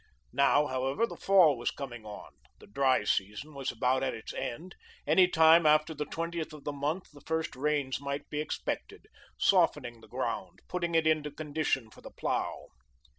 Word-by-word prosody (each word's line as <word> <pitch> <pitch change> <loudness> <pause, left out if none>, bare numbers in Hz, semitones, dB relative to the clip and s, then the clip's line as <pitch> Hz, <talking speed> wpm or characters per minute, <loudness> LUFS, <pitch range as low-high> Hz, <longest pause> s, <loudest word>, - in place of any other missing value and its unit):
Now, 140 +2 +4
however, 135 - 0
the - - -8
fall 185 -7 +5
was 120 - -1
coming 120 -5 -7
on, 105 - -9 0.3
the - - -16
dry 130 +1 +2
season 105 +9 -2
was 135 -2 -3
about 125 +3 +1
at 135 - -1
its 110 - -8
end; 170 +10 -5 0.3
any 185 -1 +5
time 160 -1 +6
after 155 +1 +4
the 150 -1 -4
twentieth 165 -1 -4
of 150 -2 -11
the 145 - -3
month 150 +6 -3
the 145 - -14
first 160 +2 -2
rains 140 -1 -1
might 140 0 -4
be 150 - -3
expected, 155 - -4 0.3
softening 120 -2 +2
the - - -15
ground, - - -4
putting 170 -2 -2
it 165 -1 +3
into 155 -1 +2
condition 145 -6 -2
for - - -16
the - - -10
plough. - - -3
145 Hz, 175 wpm, -30 LUFS, 130-160 Hz, 0.3 s, time